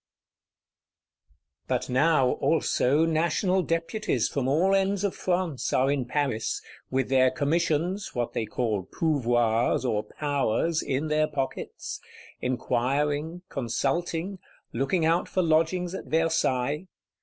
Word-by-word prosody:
But -, -, -1 dB
now 135 Hz, 0 st, +3 dB
also 155 Hz, -1 st, +2 dB
National 170 Hz, +4 st, +1 dB
Deputies 165 Hz, -, -1 dB
from 135 Hz, -3 st, -2 dB
all 170 Hz, +8 st, +3 dB
ends 195 Hz, 0 st, +1 dB
of 200 Hz, -, 0 dB
France 175 Hz, -6 st, -1 dB
are 135 Hz, +2 st, +3 dB
in 140 Hz, -3 st, 0 dB
Paris, 130 Hz, -4 st, -1 dB, 0.3 s
with 130 Hz, -1 st, 0 dB
their 130 Hz, -1 st, +5 dB
commissions, 165 Hz, +7 st, 0 dB
what 120 Hz, -1 st, -2 dB
they 110 Hz, -, -2 dB
call 105 Hz, -4 st, -2 dB
pouvoirs, 120 Hz, -7 st, +1 dB
or 110 Hz, -4 st, +1 dB
powers, 145 Hz, +5 st, -1 dB
in 140 Hz, +4 st, -1 dB
their 155 Hz, 0 st, +2 dB
pockets; 140 Hz, -3 st, -4 dB, 0.4 s
inquiring, 145 Hz, +7 st, -1 dB
consulting; 165 Hz, -, -2 dB, 0.3 s
looking 135 Hz, +7 st, +1 dB
out 165 Hz, +2 st, +2 dB
for 185 Hz, -, +1 dB
lodgings 170 Hz, +2 st, +1 dB
at -, -, -6 dB
Versailles. 160 Hz, -1 st, 0 dB
150 Hz, 115 wpm, -27 LUFS, 130-170 Hz, 0.4 s, their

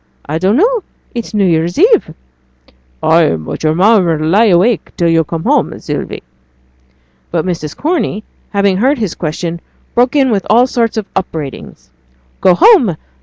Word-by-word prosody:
I 155 Hz, +3 st, -3 dB
don't 195 Hz, +6 st, +2 dB
know! 460 Hz, +6 st, +2 dB, 0.3 s
It's 235 Hz, -3 st, -5 dB
New 200 Hz, -2 st, +2 dB
Year's 170 Hz, 0 st, 0 dB
eve!' 405 Hz, -, +3 dB, 0.9 s
'Ay! 160 Hz, -, +3 dB
but 80 Hz, -1 st, -7 dB
yo'r 155 Hz, 0 st, +1 dB
mother 185 Hz, -3 st, +3 dB
'll 155 Hz, -, -2 dB
lie 210 Hz, +7 st, +4 dB
awake 195 Hz, +3 st, +2 dB
till 170 Hz, -, +1 dB
yo' 165 Hz, -1 st, +3 dB
come 160 Hz, +1 st, -5 dB
home, -, -, 0 dB
Sylvie!' -, -, -5 dB, 1.1 s
But -, -, -2 dB
Mrs. 165 Hz, -5 st, -4 dB
Corney, 300 Hz, -, -2 dB, 0.3 s
having 200 Hz, -2 st, +1 dB
heard 265 Hz, +8 st, +2 dB
his 210 Hz, -7 st, -2 dB
question, 170 Hz, +1 st, -4 dB, 0.3 s
broke 245 Hz, +4 st, +2 dB
in 270 Hz, -3 st, +3 dB
with 200 Hz, -3 st, -1 dB
all 235 Hz, +4 st, +5 dB
sorts 235 Hz, -3 st, -1 dB
of 215 Hz, -, -2 dB
upbraidings. 155 Hz, -, -6 dB, 0.5 s
'Go 185 Hz, -2 st, +4 dB
home! 235 Hz, -, +4 dB
190 Hz, 160 wpm, -13 LUFS, 165-235 Hz, 1.1 s, all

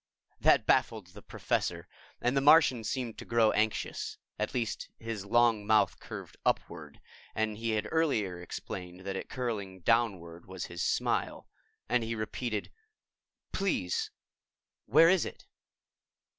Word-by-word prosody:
That -, -, +4 dB
baffled 100 Hz, -6 st, +1 dB
the 105 Hz, -, -11 dB
Professor -, -, -2 dB, 0.3 s
and 125 Hz, +2 st, +1 dB
the 135 Hz, -, +3 dB
Martian 140 Hz, -5 st, +6 dB
seemed 120 Hz, -1 st, -3 dB
to -, -, -6 dB
grow 115 Hz, -2 st, +3 dB
anxious 110 Hz, 0 st, -1 dB, 0.2 s
at 105 Hz, +3 st, -2 dB
least 115 Hz, -3 st, -2 dB
his 115 Hz, -3 st, -5 dB
long 115 Hz, -1 st, +4 dB
mouth 110 Hz, 0 st, +3 dB
curved -, -, -9 dB
upward, -, -, -2 dB, 0.4 s
and 110 Hz, -1 st, 0 dB
he 115 Hz, +2 st, -3 dB
had 105 Hz, 0 st, -1 dB
earlier 110 Hz, -, 0 dB
explained 90 Hz, +1 st, -7 dB
that 95 Hz, +1 st, -4 dB
it -, -, -5 dB
curling 100 Hz, -7 st, -4 dB
downward 90 Hz, -6 st, 0 dB
was 95 Hz, -2 st, -5 dB
his 85 Hz, 0 st, -6 dB
smile -, -, 0 dB, 0.4 s
and 120 Hz, -1 st, +2 dB
he 115 Hz, 0 st, -3 dB
repeated, 110 Hz, 0 st, -3 dB, 0.8 s
"Please, 185 Hz, -, -1 dB, 0.8 s
where 165 Hz, -, +7 dB
is 185 Hz, -1 st, +4 dB
it?" -, -, -8 dB
110 Hz, 135 wpm, -30 LUFS, 95-120 Hz, 0.8 s, where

